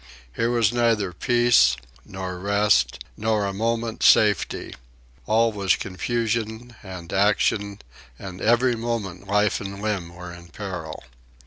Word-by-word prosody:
Here 115 - 0
was 120 -2 +2
neither 115 -6 +1
peace, 120 - +3 0.3
nor 95 -1 -6
rest, 100 -11 +2
nor 110 -1 0
a 100 - -3
moment's 115 +2 0
safety. 105 -3 +3 0.5
All 115 +1 +3
was 100 -3 +1
confusion 115 +3 -3
and 90 -4 -9
action, 100 0 +1 0.4
and 95 +2 -9
every 120 +2 +3
moment 115 -6 -4
life 105 +1 +1
and 100 0 -6
limb 100 -5 -3
were 90 0 -9
in 85 0 -12
peril. 85 -4 -7
105 Hz, 125 wpm, -23 LUFS, 95-115 Hz, 0.5 s, peace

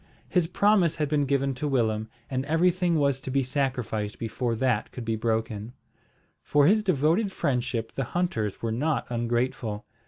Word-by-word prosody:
His 180 -4 +1
promise 185 -2 +3
had 150 -2 0
been 145 -1 +2
given 140 0 +1
to 135 +4 -3
Willem, 110 -5 0 0.2
and 130 -1 -2
everything 175 +3 +2
was 140 -3 +2
to 130 - -6
be 135 +1 +1
sacrificed 125 -6 -2
before 115 +1 -2
that 115 -2 0
could 125 - -7
be 115 0 0
broken. 110 0 -2 0.7
For 145 -1 +3
his 215 +7 +5
devoted 180 +3 +2
friendship 125 - -1
the 135 - -3
hunters 115 - -2
were 115 - 0
not 145 +6 0
ungrateful. 120 -2 -1
130 Hz, 160 wpm, -27 LUFS, 115-155 Hz, 0.7 s, his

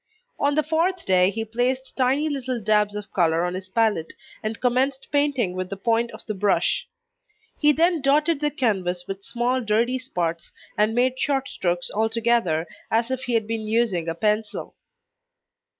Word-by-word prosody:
On 285 0 +2
the 310 - +2
fourth 335 +4 0
day, 185 -1 +4
he 225 +3 -3
placed 250 +4 -1
tiny 270 +4 +2
little 260 -4 -2
dabs 210 -1 +2
of 210 -1 -7
colour 170 -1 +2
on 180 - -2
his 185 0 -4
palette, 210 -6 +1 0.3
and 215 +1 -4
commenced 260 +2 0
painting 285 -9 +1
with 185 0 -4
the 195 - -5
point 230 +3 +1
of - - -11
the 215 - -3
brush; 200 0 +1 0.7
he 300 -1 +5
then 330 +2 +2
dotted 295 +3 +3
the 295 0 +1
canvas 190 - -1
with 195 0 -6
small 245 +3 0
dirty 235 +3 +1
spots, 170 -9 -3 0.2
and 215 +2 +2
made 255 +1 +2
short 270 -1 0
strokes 175 -1 -2
altogether 225 -6 +1 0.2
as 230 +3 +1
if 260 0 -2
he 245 -2 0
had 225 -2 +1
been 220 -1 -3
using 215 -7 +1
a 165 - -3
pencil. 210 +3 -1
230 Hz, 170 wpm, -24 LUFS, 195-260 Hz, 0.7 s, he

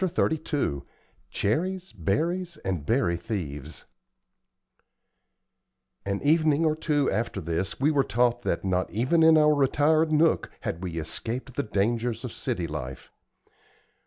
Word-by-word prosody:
CHAPTER 180 -3 +1
XXXII 145 - -2 0.5
CHERRIES, 180 - -1
BERRIES, 165 - -1
AND 90 -6 -2
BERRY 115 -9 +2
THIEVES 80 - -6 2.2
An 100 0 -2
evening 155 +1 +3
or 155 -1 +2
two 150 -3 +1
after 110 0 -2
this 85 +2 -3
we 145 +4 +3
were 140 -3 +3
taught 120 -1 +1
that 85 - -2
not 90 -1 0
even 130 +10 +1
in 160 0 +7
our 150 0 +5
retired 150 +3 +3
nook 155 +1 +3
had 85 - -4
we 90 -3 -5
escaped 120 +11 -4
the - - +1
dangers 115 +2 -1
of 125 - -5
city 115 -10 -3
life. 65 -5 -6
120 Hz, 130 wpm, -26 LUFS, 95-155 Hz, 2.2 s, in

